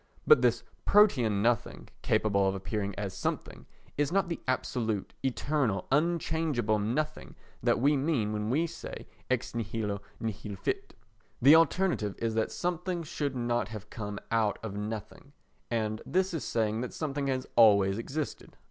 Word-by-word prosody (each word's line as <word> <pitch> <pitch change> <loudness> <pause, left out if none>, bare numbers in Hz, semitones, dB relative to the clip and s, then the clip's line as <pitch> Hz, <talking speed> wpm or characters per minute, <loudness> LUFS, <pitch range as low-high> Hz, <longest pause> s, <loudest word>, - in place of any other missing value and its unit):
But 455 - +7
this - - +2 0.2
Protean 125 - +4
nothing, 120 -1 0
capable 100 -2 +2
of 95 - -2
appearing 100 0 -3
as 100 -2 -3
something, - - -4 0.3
is 145 0 +2
not 195 -1 +1
the 170 - -3
absolute, 115 -5 -1
eternal, 135 -6 0
unchangeable 150 -7 +1
nothing 150 +9 -2 0.3
that - - +2
we 145 +4 +4
mean 135 -7 0
when 105 0 -2
we 155 +7 +2
say 170 - -7 0.2
ex 130 -1 -1
nihilo 105 -2 -2 0.2
nihil 105 -2 -4
fit. 90 - -3 0.4
The 140 +5 +8
alternative 165 - +2
is 115 -1 -1
that 110 0 0
something 175 0 -2
should 145 -3 -3
not 120 -3 0
have 105 -1 -9
come 105 -2 -5
out 110 -3 +2
of 105 -3 -5
nothing, 110 +6 -6 0.4
and 110 -2 -1
this 185 +1 0
is 165 - -2
saying 110 -1 0
that 125 - -5
something 145 -3 -2
has 130 -1 -1
always 100 -3 +6
existed. 145 +5 -5
120 Hz, 150 wpm, -30 LUFS, 105-150 Hz, 0.4 s, The